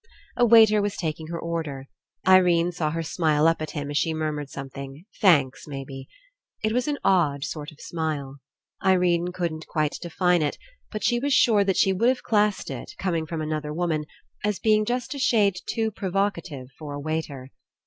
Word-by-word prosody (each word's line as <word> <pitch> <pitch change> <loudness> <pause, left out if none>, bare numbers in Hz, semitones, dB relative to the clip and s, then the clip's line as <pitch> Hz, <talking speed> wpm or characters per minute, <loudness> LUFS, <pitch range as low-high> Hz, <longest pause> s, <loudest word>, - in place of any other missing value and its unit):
A 245 -1 +4
waiter 220 -2 +7
was 205 0 -2
taking 160 -2 -3
her 170 +1 -4
order. 160 -5 -4 0.4
Irene 180 -2 +5
saw 165 -3 -1
her 165 +1 -3
smile 155 -1 +2
up 165 -1 +2
at 155 - -3
him 145 0 -3
as 145 - +1
she 160 -1 0
murmured 150 -2 -3
some 135 0 -7
thing 135 +4 -9
— - - -26
thanks, 150 - +3
maybe. 135 -1 -7 0.6
It 215 - +1
was 250 +3 0
an 295 -1 0
odd 150 -7 +2
sort 150 +1 -5
of 155 - -19
smile. 150 -5 -4 0.5
Irene 180 -2 +2
couldn't 170 -3 -4
quite 155 -1 -1
define 175 0 +1
it, 150 - -1 0.3
but 215 - -5
she 240 -1 +2
was 280 +2 +1
sure 215 -4 +5
that 190 -1 +1
she 190 - +4
would 230 +6 +3
have 260 - -1
classed 210 -2 +1
It, - - -7
com 185 -2 -1
ing 160 -1 -1
from 160 0 -4
another 155 -1 -3
woman, 160 -2 -1 0.4
as 210 -1 0
being 215 -1 +3
just 245 +4 -2
a 280 - -6
shade 210 -7 +3
too 225 -1 -1
provocative 185 -9 -2
for 150 -2 -6
a - - -5
waiter. 145 -3 -4
165 Hz, 195 wpm, -25 LUFS, 150-200 Hz, 0.6 s, waiter